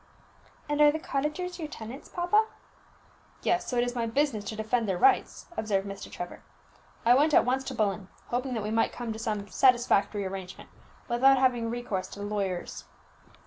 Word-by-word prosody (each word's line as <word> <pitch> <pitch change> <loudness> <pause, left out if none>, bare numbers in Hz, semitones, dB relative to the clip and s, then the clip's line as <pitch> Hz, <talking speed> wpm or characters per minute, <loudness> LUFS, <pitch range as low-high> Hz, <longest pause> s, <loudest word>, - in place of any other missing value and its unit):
"And 295 0 0
are 295 0 +8
the 310 - -2
cottagers 315 +5 -3
your 315 - -3
tenants, 250 -1 -9
papa?" 380 +5 +2 1.0
"Yes; 355 0 +1
so 250 - -2
it 240 - +4
is 245 0 -2
my 235 -2 -1
business 255 -3 0
to 215 - -4
defend 220 +1 0
their 185 - 0
rights," 395 - +3
observed 200 -3 -1
Mr. 195 0 -8
Trevor. 175 0 -7 0.6
"I 240 - +7
went 295 +4 +4
at - - +6
once 260 +2 +1
to - - -5
Bullen, 200 -2 0 0.2
hoping 250 +1 -1
that 220 - -2
we 210 - -3
might 225 0 +1
come 235 -2 -4
to 220 - -8
some 210 -3 -3
satisfactory 230 -6 +3
arrangement, 190 -1 -7 0.4
without 265 +3 +5
having 245 -3 +2
recourse 225 -6 -3
to 200 - -11
the 205 - -4
lawyers." 195 -4 -3
235 Hz, 185 wpm, -28 LUFS, 205-270 Hz, 1.0 s, are